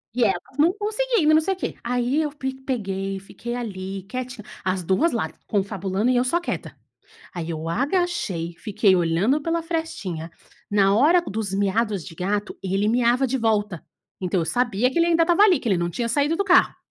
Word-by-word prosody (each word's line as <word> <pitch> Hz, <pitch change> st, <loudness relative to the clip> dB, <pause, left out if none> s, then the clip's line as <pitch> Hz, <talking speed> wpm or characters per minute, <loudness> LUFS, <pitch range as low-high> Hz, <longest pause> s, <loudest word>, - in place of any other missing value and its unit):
e 250 Hz, -, +2 dB
elas 195 Hz, +5 st, -1 dB
não 330 Hz, +4 st, +5 dB
conseguindo 425 Hz, -5 st, +1 dB
e -, -, +5 dB
não 315 Hz, -, +6 dB
sei 385 Hz, +4 st, -1 dB
quê. 370 Hz, -, -4 dB
Aí 245 Hz, +5 st, 0 dB
eu 300 Hz, -, -1 dB
pi 265 Hz, -2 st, -4 dB
peguei, 195 Hz, -7 st, -3 dB
fiquei 240 Hz, +5 st, -7 dB
ali 195 Hz, -5 st, -5 dB
quietinha, 255 Hz, +1 st, -6 dB, 0.2 s
as 185 Hz, -1 st, -1 dB
2 195 Hz, -, +2 dB
lá, 230 Hz, -, -1 dB, 0.2 s
confabulando 200 Hz, +2 st, 0 dB
e -, -, +2 dB
eu 245 Hz, -, +3 dB
só 295 Hz, +7 st, +1 dB
quieta. 345 Hz, -, -5 dB, 0.6 s
Aí 170 Hz, -2 st, -5 dB
eu 160 Hz, 0 st, -4 dB
agachei, 245 Hz, -, -1 dB
fiquei 205 Hz, -1 st, +2 dB
olhando 180 Hz, -, +2 dB
pela 330 Hz, +2 st, -1 dB
frestinha, 320 Hz, -, -4 dB, 0.4 s
na 200 Hz, -1 st, +3 dB
hora 315 Hz, +10 st, +5 dB
dos 215 Hz, -, -4 dB
miados 205 Hz, -1 st, 0 dB
de -, -, -9 dB
gato, 205 Hz, +4 st, -2 dB
ele 195 Hz, +2 st, 0 dB
miava 245 Hz, +2 st, +3 dB
de 265 Hz, +1 st, -1 dB
volta. 210 Hz, -6 st, 0 dB, 0.4 s
Então, 185 Hz, -1 st, 0 dB
eu -, -, -2 dB
sabia 240 Hz, +5 st, +1 dB
que -, -, -3 dB
ele 335 Hz, -, +5 dB
ainda 335 Hz, -1 st, +4 dB
estava 345 Hz, +4 st, +4 dB
ali, 380 Hz, -5 st, +5 dB
que 235 Hz, -, -3 dB
ele 190 Hz, -, +3 dB
não 170 Hz, 0 st, -1 dB
tinha 235 Hz, +7 st, -2 dB
saído 290 Hz, +6 st, +1 dB
do 400 Hz, -, 0 dB
carro 370 Hz, -2 st, +4 dB
230 Hz, 195 wpm, -23 LUFS, 195-300 Hz, 0.6 s, não